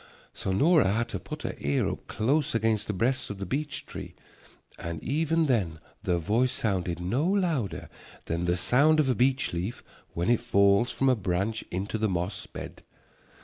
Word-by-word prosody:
So 95 - -3
Nora 145 - +4
had 115 +2 0
to 100 - -4
put 95 - -8
her - - -3
ear 70 -1 +1
up - - -5
close 135 +5 +1
against 110 -2 +1
the - - 0
breast 125 +7 0
of 100 - -5
the 100 - -4
beech 145 - -3
tree - - -8 0.6
and 85 -1 -4
even 160 +4 +1
then 95 - 0 0.2
the 90 - +1
voice 110 +9 +1
sounded 95 -8 -1
no 95 +11 0
louder 165 - 0 0.4
than 85 +2 -2
the 90 +1 +1
sound 150 - +4
of 145 -3 +3
a - - +4
beech 130 +1 +1
leaf 90 +8 -3 0.3
when 85 +7 +1
it 120 - +4
falls 100 +3 +3
from 135 - 0
a 130 - +5
branch 100 +2 -1
into 100 +5 -3
the 110 0 +1
moss 90 +1 -3
bed. - - -8
110 Hz, 185 wpm, -28 LUFS, 90-135 Hz, 0.6 s, a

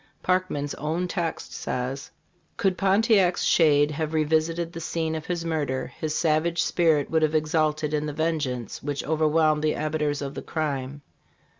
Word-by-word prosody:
Parkman's 180 -6 0
own 160 +5 -1
text 170 -3 -3
says: 130 +2 -4 0.5
"Could 190 -2 +1
Pontiac's 195 -1 +3
shade 145 -2 +4
have 155 +1 -3
revisited 160 +2 +1
the 165 - -6
scene 160 0 -2
of 160 -1 -5
his 175 -2 -2
murder, 145 -5 -2
his 155 -1 -1
savage 165 +1 +1
spirit 160 -5 +2
would 160 0 +2
have 155 0 +2
exulted 155 -1 +1
in 150 0 0
the - - -2
vengeance 145 -7 -2
which 145 -1 -3
overwhelmed 155 0 +2
the 155 - +2
abettors 150 -1 -1
of 140 0 -5
the - - -6
crime. 145 -3 -3
155 Hz, 155 wpm, -25 LUFS, 150-165 Hz, 0.5 s, shade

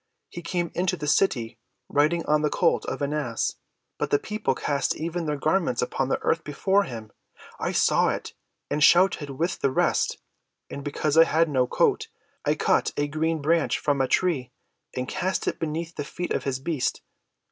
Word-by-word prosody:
He 175 - -8
came 175 0 -2
into 185 +1 0
the 150 - -5
city 130 -7 +1 0.3
riding 155 +4 +2
on 150 0 +2
the 150 - +1
colt 170 +3 +1
of - - -3
an 140 +1 -1
ass; 130 -7 -2 0.4
but - - -1
the 145 - +4
people 210 -7 -2
cast 140 +1 -1
even 165 +1 -3
their 150 -1 -1
garments 155 -3 +1
upon 130 +1 -1
the - - +1
earth 165 - +1
before 195 +7 +1
him. 110 -3 -8 0.5
I - - -1
saw - - +3
it, - - -4 0.3
and 150 - 0
shouted 175 -4 +5
with 165 +6 -2
the 140 - +2
rest; 130 - +1 0.5
and 140 - -6
because 145 +1 -1
I 165 - +9
had 165 0 +2
no 130 -3 +2
coat, - - +1 0.4
I - - +1
cut - - +1
a 145 - +1
green 155 +1 -1
branch 165 +2 +2
from 140 -2 0
a 130 - +2
tree 155 -5 +1 0.4
and 125 0 -2
cast 190 +3 -2
it - - -1
beneath 165 +1 -3
the 145 - -3
feet 175 +5 -4
of - - -2
his 135 -2 -1
beast. 140 0 -2
150 Hz, 190 wpm, -25 LUFS, 140-170 Hz, 0.5 s, I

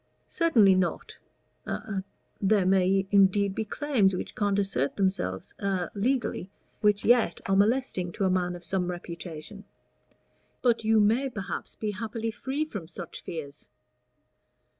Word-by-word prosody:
"Certainly 235 - +4
not; 185 -2 -1 0.5
a 195 -3 -3 0.4
there 195 -1 +3
may 190 +1 +3
indeed 200 0 +4
be 220 - -2
claims 220 -5 +1
which - - -5
can't 205 -1 0
assert 195 -9 0
themselves 185 - -1
a 190 -3 -1
legally, 225 -4 -1 0.3
which 210 -1 +2
yet 240 0 +4
are 195 - +2
molesting 205 -4 +1
to 205 - -2
a - - +3
man 180 -1 0
of 175 - -10
some 180 -1 -1
reputation. 170 +2 -7 1.0
But 235 -2 +3
you 220 0 +4
may 230 +6 +2
perhaps 195 -7 -6
be 215 -1 -2
happily 225 +2 -4
free 275 +7 -2
from 205 - -7
such 170 0 -8
fears." 150 -4 -8
195 Hz, 140 wpm, -28 LUFS, 180-220 Hz, 1.0 s, Certainly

